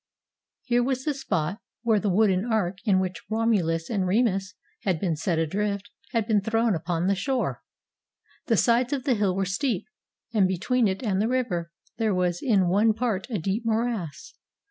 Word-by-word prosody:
Here 245 -1 +2
was 260 +1 -1
the 300 - +1
spot 190 - -2 0.2
where 225 -3 +3
the 205 - 0
wooden 190 -1 +3
ark 205 -6 0
in 195 -4 +4
which 185 -3 -3
Romulus 200 -8 +1
and 195 -5 -1
Remus 195 -2 +1 0.3
had 185 -5 0
been 170 -3 0
set 165 +2 -1
adrift 200 +6 -1 0.2
had 230 -4 0
been 215 -3 +2
thrown 225 +1 +1
upon 170 0 -1
the 195 - +3
shore. 260 +6 -1 0.9
The 230 - +3
sides 240 +5 +3
of 270 -3 -2
the 275 - +2
hill 205 -4 +1
were 195 0 0
steep, 200 +2 -1 0.5
and 200 -4 +4
between 215 +6 +1
it 190 +5 -2
and 200 -4 +1
the 220 - +1
river 220 -10 -1 0.3
there 220 -3 +1
was 180 -1 0
in 200 -8 +3
one 210 +5 +4
part 225 -5 -1
a 225 - -1
deep 195 +6 -2
morass. 225 -8 -2
205 Hz, 180 wpm, -26 LUFS, 185-230 Hz, 0.9 s, in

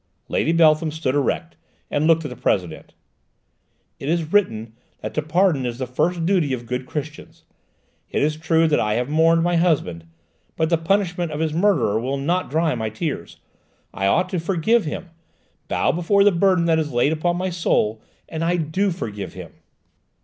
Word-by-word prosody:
Lady 160 - +1
Beltham 160 -1 +4
stood 155 -4 -2
erect, 145 +4 -1 0.3
and 150 +2 +1
looked 165 -1 +3
at - - -3
the 125 - -8
President. 90 -9 -2 1.0
"It 140 - -4
is 165 0 -1
written 115 - +1 0.3
that - - -5
to 155 - 0
pardon 160 -2 +2
is 120 -1 -3
the 130 - -3
first 165 +7 -1
duty 170 -7 +2
of 120 -2 -4
good 125 +2 -4
Christians. 150 +1 -7 0.7
It - - 0
is 150 +1 +1
true 160 +1 +2
that 150 - +2
I 105 0 0
have 125 +3 -1
mourned 165 +2 +3
my 175 0 +2
husband, 135 - 0 0.5
but 160 +1 0
the 170 - +4
punishment 175 -1 0
of 150 - -4
his 160 -1 -1
murderer 165 - +2
will 130 +4 -2
not 170 +7 -1
dry 160 +2 +1
my 110 -3 -2
tears; 110 - -5 0.6
I 95 - -1
ought 180 - +2
to 185 - -2
forgive 190 +6 +1
him, 165 +3 -6 0.6
bow - - +1
beneath 170 0 -5 0.2
the 205 - +6
burden 185 -1 +2
that 165 -1 +3
is 150 -2 -2
laid 125 +5 +2
upon 175 +2 0
my 185 +1 -2
soul: 110 -10 0 0.3
and 160 0 -4
I 175 +2 +1
do 175 +5 0
forgive 105 - -5
him!" - - -9
160 Hz, 185 wpm, -22 LUFS, 130-170 Hz, 1.0 s, the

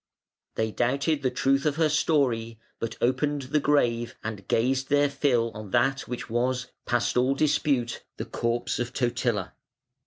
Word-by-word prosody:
They 110 0 0
doubted 140 +6 0
the 130 - +1
truth 135 +2 +1
of 150 -2 +1
her 160 0 +3
story, 130 -7 +1 0.2
but 115 - -4
opened 140 +3 +1
the 140 +4 +1
grave 120 -5 +1
and 105 -3 -6
gazed 130 +3 +1
their 145 0 +3
fill 125 -5 +1
on 105 -2 -8
that 135 +5 +1
which 125 - -5
was, 125 +2 -1 0.2
past 120 0 +1
all 130 +2 +3
dispute, 140 -5 +1
the - - -4
corpse 115 +1 -2
of 120 0 -3
Totila. 120 -3 -1
130 Hz, 155 wpm, -26 LUFS, 120-140 Hz, 0.2 s, her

